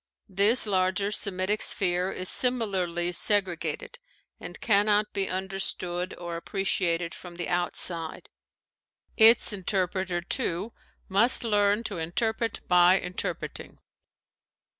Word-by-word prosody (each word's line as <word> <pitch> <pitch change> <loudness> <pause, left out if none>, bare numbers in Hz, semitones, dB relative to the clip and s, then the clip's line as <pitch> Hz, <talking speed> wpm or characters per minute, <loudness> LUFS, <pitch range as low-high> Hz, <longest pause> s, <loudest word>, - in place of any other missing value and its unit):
This 200 +6 +4
larger 190 0 0
Semitic 200 0 0
sphere 180 0 0
is 185 -1 -4
similarly 190 -9 +1
segregated 190 - -1 0.4
and - - -9
cannot 210 0 +2
be 195 -1 -2
understood 185 -1 -4
or 170 -1 -6
appreciated 170 -2 -2
from 175 -1 -11
the 175 - -5
outside. 175 -2 -2 0.9
Its 225 0 +5
interpreter, 185 -2 -2
too, 195 +1 -2 0.3
must 225 +7 +3
learn 205 -1 +2
to 180 - -5
interpret 220 +7 -2
by 180 +1 +5
interpreting. 180 0 -6
190 Hz, 100 wpm, -26 LUFS, 175-210 Hz, 0.9 s, Its